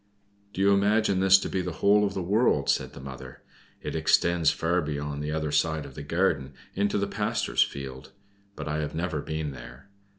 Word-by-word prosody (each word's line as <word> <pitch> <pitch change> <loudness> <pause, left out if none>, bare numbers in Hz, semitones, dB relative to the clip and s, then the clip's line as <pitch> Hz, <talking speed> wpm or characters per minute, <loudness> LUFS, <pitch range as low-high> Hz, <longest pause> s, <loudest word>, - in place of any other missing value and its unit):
"Do 95 - -4
you 100 +1 +5
imagine 100 0 +2
this 95 0 +7
to - - -4
be 95 - -1
the 90 -1 -4
whole 105 +4 +4
of 100 -1 -1
the 95 - -2
world?" 105 +7 +2
said - - -2
the - - -10
mother. 65 -1 -10 0.4
"It - - -4
extends 85 -3 +3
far 85 +3 0
beyond 75 -1 -4
the 75 +1 -3
other 75 -1 -2
side 80 +1 +1
of - - -11
the 75 - -8
garden 70 -3 0 0.2
in 100 +1 +1
the 100 0 0
pastor's 105 +1 -1
field; 65 -2 -3 0.4
but - - -6
I 75 +1 -1
have 75 -1 -3
never 85 -2 -2
been 80 -1 -4
there. 65 +9 -12
80 Hz, 200 wpm, -27 LUFS, 75-95 Hz, 0.4 s, this